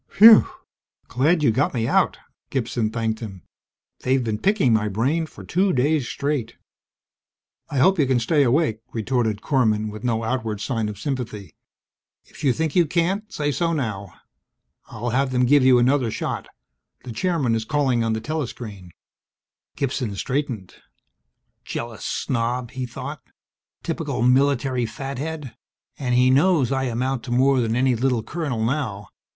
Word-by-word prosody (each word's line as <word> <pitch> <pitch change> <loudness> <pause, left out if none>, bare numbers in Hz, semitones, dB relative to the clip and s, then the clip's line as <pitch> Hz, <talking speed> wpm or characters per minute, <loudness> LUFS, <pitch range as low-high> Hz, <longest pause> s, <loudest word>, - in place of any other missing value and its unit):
"Whew! 220 +1 +9 0.6
Glad 150 +6 +2
you 140 - +5
got 135 +4 0
me 115 -1 0
out!" - - +2 0.3
Gibson 120 -3 -1
thanked 110 -1 -2
him. 95 -6 -8 0.6
"They've 130 0 +1
been 110 -2 -2
picking 190 - +2
my 110 -1 +2
brain 135 +11 0
for - - -12
two 190 +2 +1
days 140 0 +1
straight!" 140 -5 -2 1.1
"I 140 - -3
hope 190 +7 +4
you 140 - +3
can 130 -2 +2
stay 145 +6 +2
awake," 130 -3 +2
retorted 110 -2 -1
Korman 110 -6 +1
with 110 +2 -9
no 115 -2 0
outward 110 -3 -2
sign 110 -2 -2
of 105 - -7
sympathy. 110 - -5 0.7
"If - - -14
you 135 - +4
think 160 +2 -2
you 175 -3 +4
can't, 185 +7 -1
say 145 -1 -1
so 170 +3 0
now. 105 - -4 0.7
I'll 120 +2 -4
have 135 +2 +1
them 125 -1 +2
give 140 +2 +5
you 130 -1 +6
another 125 0 +2
shot. - - -4 0.6
The 125 - -7
Chairman 160 -4 0
is 110 -1 0
calling 130 -2 +1
on 115 -1 0
the 110 - -2
telescreen." 115 - -5 0.9
Gibson 130 -6 -2
straightened. 125 -5 -3 0.9
Jealous 115 -1 -6
snob! 120 -1 -2
he 130 -1 -4
thought. 115 - -7 0.6
_Typical 120 - -1
military 130 -2 +2
fathead, 135 +2 -6 0.4
and 125 -3 0
he 125 +1 +4
knows 145 -1 +3
I 135 0 0
amount 125 +1 -1
to 120 - -6
more 130 +2 +3
than 115 -2 0
any 130 +1 +3
little 125 -1 0
colonel 140 -10 -2
now. 115 -7 -2
125 Hz, 155 wpm, -23 LUFS, 115-145 Hz, 1.1 s, Whew